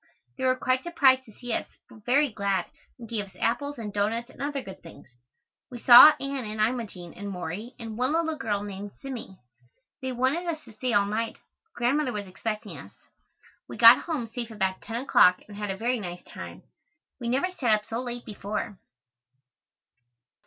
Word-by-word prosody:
They 260 - -3
were 255 0 +4
quite 255 0 0
surprised 265 -6 +3
to 220 - -15
see 245 +2 -6
us, - - -2 0.2
but 215 - -17
very 280 +2 +3
glad 200 -4 -1 0.3
and 235 -2 -10
gave 215 -2 -2
us 190 - -19
apples 285 +5 -1
and 210 -3 -6
doughnuts 225 +4 -1
and - - -13
other 280 -1 -2
good 190 - -10
things. 165 - -14 0.6
We 245 - -8
saw 245 +5 +10
Anne 275 -1 -3
and 215 0 -6
Imogene 215 -6 -2
and 200 +1 -7
Morey 190 +6 -6
and 225 -3 -7
one 255 +3 +1
little 320 -1 0
girl 205 -7 -2
named 200 0 -8
Zimmie. 250 -8 -7 0.6
They 260 0 -3
wanted 260 +8 0
us 315 -2 -3
to 230 - -14
stay 255 +3 -2
all 200 -2 +4
night, 220 +3 -2 0.3
but 445 - -46
Grandmother 255 +3 +1
was 205 -1 -4
expecting 205 -3 -5
us. 95 - -12 0.8
We - - -7
got 230 +1 +9
home 305 -8 -2
safe 240 -2 -4
about 190 -4 -2
ten 230 +1 -4
o'clock 180 -8 +4
and 205 - -11
had 205 0 -4
a 195 - -3
very 240 +3 0
nice 180 -3 -7
time. - - -10 0.6
We 235 -2 -3
never 275 +9 +1
sat 245 -11 +2
up 210 0 -5
so 225 +1 -3
late 245 -1 -6
before. 210 -1 -5
230 Hz, 190 wpm, -27 LUFS, 205-260 Hz, 0.8 s, saw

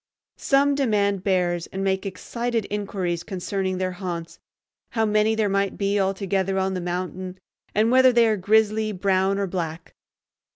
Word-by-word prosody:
Some 280 +1 +3
demand 205 -8 +1
bears, 175 -3 0
and 190 0 -4
make 190 +1 0
excited 230 +4 -3
inquiries 195 -4 -2
concerning 190 0 -3
their 185 0 -1
haunts, 175 -3 -6 0.5
how 225 -2 +2
many 215 +1 +2
there 220 -1 +1
might 195 0 0
be 200 0 +1
altogether 195 0 0
on 190 0 0
the 185 - -3
mountain, 180 +1 -4 0.4
and 220 +3 +3
whether 260 0 +6
they 235 -1 +4
are 220 -1 +3
grizzly, 215 +2 +2
brown, 190 0 +1
or 200 - 0
black. 170 -3 -5
195 Hz, 155 wpm, -24 LUFS, 185-215 Hz, 0.5 s, whether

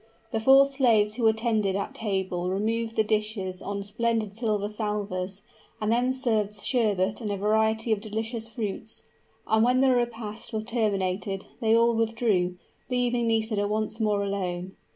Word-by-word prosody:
The 225 - 0
four 270 +4 +7
slaves 235 -7 +3
who 235 -3 +3
attended 220 -3 +1
at 200 - -3
table 190 -4 -2
removed 225 +4 -1
the 220 - +3
dishes 210 -3 -2
on 200 0 -4
splendid 215 0 -1
silver 210 -3 0
salvers, 205 -3 -3 0.4
and 215 0 0
then 245 +2 +2
served 220 -6 0
sherbet 205 -2 0
and 210 -2 -2
a 200 - -1
variety 220 +2 +1
of 210 -2 +1
delicious 225 +1 -4
fruits; 220 -1 -5 0.4
and 220 0 +3
when 250 +2 +3
the 265 -1 +5
repast 235 -2 -3
was 215 0 -1
terminated, 195 -4 -1
they 225 -2 +3
all 235 0 +4
withdrew, 225 -6 +1 0.3
leaving 245 -1 +1
Nisida 220 -2 +1
once 215 +1 -2
more 210 -2 +1
alone. 185 -2 -3
220 Hz, 150 wpm, -27 LUFS, 200-230 Hz, 0.4 s, four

